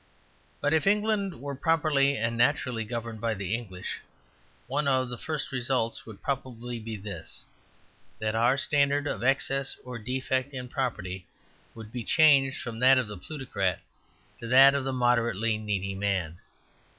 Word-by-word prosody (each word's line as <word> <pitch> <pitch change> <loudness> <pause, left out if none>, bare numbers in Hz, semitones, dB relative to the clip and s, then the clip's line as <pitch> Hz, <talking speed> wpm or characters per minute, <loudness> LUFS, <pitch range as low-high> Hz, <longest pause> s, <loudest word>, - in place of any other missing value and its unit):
But 145 +1 +2
if 160 +2 +2
England 205 - +1
were 140 +2 -5
properly 140 -2 +2
and 115 +1 -1
naturally 120 -1 +1
governed 115 -1 -5
by 115 -1 0
the 95 0 -3
English, 100 -6 -5 0.7
one 140 +3 -1
of 130 -2 +2
the 120 - -5
first 155 -2 -4
results 125 -3 -1
would 110 -3 -11
probably 125 -3 -4
be 110 -1 -6
this: 100 0 -7 0.7
that 110 0 -2
our 120 +4 +3
standard 140 0 +2
of 115 -6 -3
excess 135 +1 +1
or 125 -2 -6
defect 130 +3 -2
in 125 -1 -6
property 95 -9 -3 0.5
would 110 -1 -10
be 120 -1 -4
changed 140 -2 +4
from 115 -2 -6
that 130 +1 +6
of 125 -4 +1
the 105 - -7
plutocrat 100 - -2 0.6
to 115 - -7
that 135 +3 +8
of 140 -1 -1
the 135 - -1
moderately 115 -3 +1
needy 100 -2 -2
man. 95 -4 -2
125 Hz, 155 wpm, -28 LUFS, 110-140 Hz, 0.7 s, that